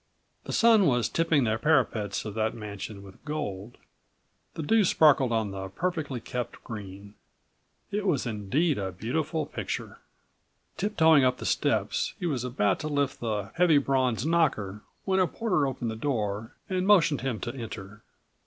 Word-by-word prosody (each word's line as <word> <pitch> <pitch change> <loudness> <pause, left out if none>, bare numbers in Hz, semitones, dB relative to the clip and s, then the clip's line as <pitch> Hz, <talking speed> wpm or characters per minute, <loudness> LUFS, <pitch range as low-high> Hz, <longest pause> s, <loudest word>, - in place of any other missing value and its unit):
The - - -5
sun 225 -5 +5
was 125 -3 +2
tipping 165 -4 +2
the 110 -1 0
parapets 110 -9 +1
of 105 - -5
that 110 0 -1
mansion 100 -2 -7
with 95 -1 -15
gold; 120 -8 -5 0.8
the 160 - -4
dew 225 +7 +4
sparkled 145 -8 +4
on 110 -3 0
the 95 0 -6
perfectly88 145 - -3
kept 125 -2 -5
green. 100 -2 -8 0.8
It 205 0 -1
was 145 -9 +1
indeed 120 - 0
a 95 -1 -3
beautiful 150 - -2
picture. - - -5 0.8
Tiptoeing 160 -8 +4
up 125 0 +2
the - - -7
steps, - - 0
he - - -3
was 135 -8 -1
about 105 -6 0
to 155 - -4
lift 145 -2 -1
the 105 -4 -3
heavy 175 -3 +4
bronze 130 -3 +1
knocker 110 - +1 0.2
when 190 -1 +2
a 185 - +4
porter 180 -11 0
opened 120 -3 -3
the - - -5
door 110 -4 -2
and 185 0 -1
motioned 170 -8 +4
him 125 -4 -2
to 120 - -4
enter. 105 -4 -8
125 Hz, 160 wpm, -27 LUFS, 105-160 Hz, 0.8 s, sun